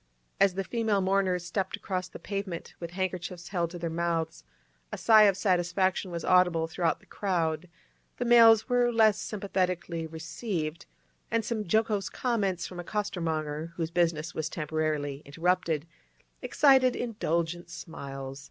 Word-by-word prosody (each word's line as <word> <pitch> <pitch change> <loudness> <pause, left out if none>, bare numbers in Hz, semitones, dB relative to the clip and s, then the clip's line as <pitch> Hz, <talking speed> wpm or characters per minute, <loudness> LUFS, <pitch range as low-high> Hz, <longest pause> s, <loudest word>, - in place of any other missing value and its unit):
As 195 -2 +4
the 195 - -1
female 220 -1 0
mourners 190 -2 +1
stepped 190 +2 -2
across 185 -2 -3
the - - -9
pavement 195 -4 -5
with 170 - -5
handkerchiefs 180 -1 -4
held 175 -4 -1
to 175 - -8
their 170 0 -3
mouths, 165 -1 -2 0.5
a - - -4
sigh 215 -2 +7
of 195 -2 +3
satisfaction 185 0 +1
was 170 -2 -5
audible 180 -3 +4
throughout 165 0 -1
the - - -21
crowd; 175 -3 -1 0.5
the 245 - -2
males 230 -2 +7
were 245 -1 +3
less 220 -3 +4
sympathetically 185 -5 -2
received, 160 0 -4 0.4
and 230 -1 0
some 220 -2 -2
jocose 210 0 +1
comments 200 -8 -1
from 180 - -8
a - - -4
costermonger, 165 -6 -3
whose 165 -1 -3
business 165 -1 0
was 160 0 -3
temporarily 150 -3 -2
interrupted, 165 0 0 0.6
excited 265 -3 +4
indulgent 175 -7 -2
smiles. 135 -5 -7
180 Hz, 145 wpm, -28 LUFS, 165-200 Hz, 0.6 s, sigh